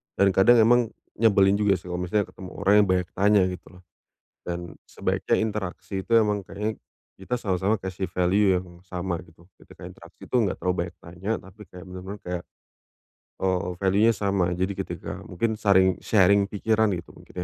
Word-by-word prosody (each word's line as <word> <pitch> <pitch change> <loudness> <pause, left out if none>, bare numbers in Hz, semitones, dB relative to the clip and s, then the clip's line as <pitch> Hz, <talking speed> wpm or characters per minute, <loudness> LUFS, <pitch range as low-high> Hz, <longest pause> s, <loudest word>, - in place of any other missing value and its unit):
Dan 100 -1 +4
kadang 110 +6 +5
emang 120 +1 +4 0.3
nyebelin 100 -3 +4
juga 105 -2 +3
sih 90 0 -9
kalau 90 - -3
misalnya 95 +4 0
ketemu 95 -1 -10
orang 100 - +2
yang 100 - +1
banyak 90 -1 +1
tanya 100 +1 +4
gitu 90 -1 -9
loh. 90 - -17 0.6
Dan 85 -1 -5 0.2
sebaiknya - - -1
interaksi 100 -3 -3
itu 115 - -15
emang 105 -2 +2
kayaknya 105 +1 -4 0.4
kita 110 +6 -3
sama-sama 95 -1 0
kasih 95 0 -4
value 95 +2 +2
yang 90 -1 -9
sama 90 -1 -3
gitu. 80 0 -21 0.2
Ketika - - -15
interaksi - - -13
itu, - - -4
enggak 100 - -1
terlalu 90 0 -1
banyak 85 - -14
tanya, 90 +5 -5
tapi 95 +3 -15
kayak 90 +1 -11
benar-benar 95 +2 -8
kayak, 90 -1 -4 1.0
eee, 90 0 0
value-nya 100 +4 +3
sama. 100 -3 +1
Jadi 95 +2 -1
ketika - - -6
mungkin 110 +6 -1
saring 95 -2 +4
sharing 100 -1 +4
pikiran 110 +1 +1
gitu, 85 - -10
mungkin - - -17
95 Hz, 170 wpm, -25 LUFS, 90-105 Hz, 1.0 s, kadang